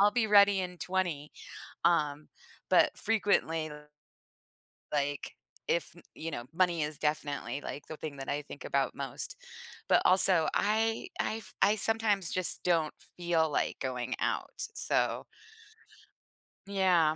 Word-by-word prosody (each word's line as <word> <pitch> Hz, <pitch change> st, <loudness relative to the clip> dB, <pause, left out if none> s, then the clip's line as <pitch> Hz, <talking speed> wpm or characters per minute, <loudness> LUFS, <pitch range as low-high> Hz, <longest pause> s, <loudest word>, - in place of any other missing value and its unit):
I'll 205 Hz, +1 st, +5 dB
be 225 Hz, 0 st, +1 dB
ready 200 Hz, -1 st, +5 dB
in 180 Hz, -1 st, -6 dB
20." 175 Hz, -6 st, -3 dB, 0.5 s
Um, 150 Hz, -3 st, +1 dB, 0.4 s
but -, -, +3 dB
frequently 190 Hz, -7 st, 0 dB, 1.2 s
like, 145 Hz, 0 st, -2 dB, 0.4 s
if -, -, -1 dB, 0.2 s
you 165 Hz, -, -6 dB
know, 120 Hz, -, -5 dB
money 175 Hz, -2 st, +1 dB
is 150 Hz, 0 st, -4 dB
definitely 145 Hz, -3 st, -2 dB
like 145 Hz, -, -7 dB
the 155 Hz, -, -8 dB
thing 150 Hz, -3 st, -7 dB
that 135 Hz, -, -7 dB
I 145 Hz, +1 st, -2 dB
think 140 Hz, -1 st, -11 dB
about 140 Hz, -1 st, -1 dB
most. 135 Hz, -3 st, -3 dB, 0.5 s
But -, -, +4 dB
also, 185 Hz, -3 st, +8 dB
I 220 Hz, +2 st, 0 dB
I 220 Hz, -, -1 dB
f 225 Hz, -, -10 dB
I 205 Hz, +2 st, +4 dB
sometimes 215 Hz, -3 st, +2 dB
just 185 Hz, -1 st, +3 dB
don't 165 Hz, -4 st, +1 dB, 0.2 s
feel 170 Hz, -2 st, +1 dB
like -, -, -2 dB
going 130 Hz, -1 st, -3 dB
out, -, -, -2 dB
so. -, -, -1 dB, 1.4 s
Yeah, 180 Hz, -6 st, +2 dB
170 Hz, 135 wpm, -30 LUFS, 150-195 Hz, 1.4 s, also